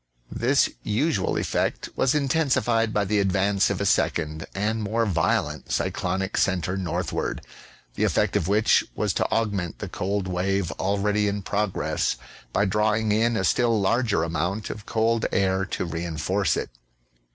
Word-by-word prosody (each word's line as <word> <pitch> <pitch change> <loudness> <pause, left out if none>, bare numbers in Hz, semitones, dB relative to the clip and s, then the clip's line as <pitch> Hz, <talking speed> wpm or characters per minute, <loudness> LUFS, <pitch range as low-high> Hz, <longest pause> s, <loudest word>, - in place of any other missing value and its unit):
This - - +2
usual 110 - 0
effect - - -1
was 135 - +2
intensified 130 -6 +1
by 105 -1 +1
the 105 +2 +1
advance 100 +1 +2
of 100 -2 -2
a 100 - -1
second, 80 -4 0
and 110 +3 -1
more 110 +3 0
vio 95 -6 +2
lent, - - -8
cyclonic 95 +1 -1
centre 90 -1 +1
northward; 90 -2 -2 0.5
the - - -2
effect - - +1
of 85 - +1
which 105 +3 +4
was - - 0
to - - 0
aug 110 -1 +1
ment 90 -4 -3
the - - -5
cold 100 0 -2
wave 95 0 0
already 105 +2 +1
in 100 0 -2
progress 105 0 -1 0.4
by 105 - +2
drawing 105 +2 +1
in 115 +2 +2
a - - 0
still 115 -3 +2
larger 105 -2 +1
amount 90 +6 -2
of 105 +1 -9
cold 115 0 +1
air 95 0 +1
to 95 - -3
re 85 0 -4
enforce 85 +4 0
it. - - -4
100 Hz, 160 wpm, -25 LUFS, 95-110 Hz, 0.5 s, which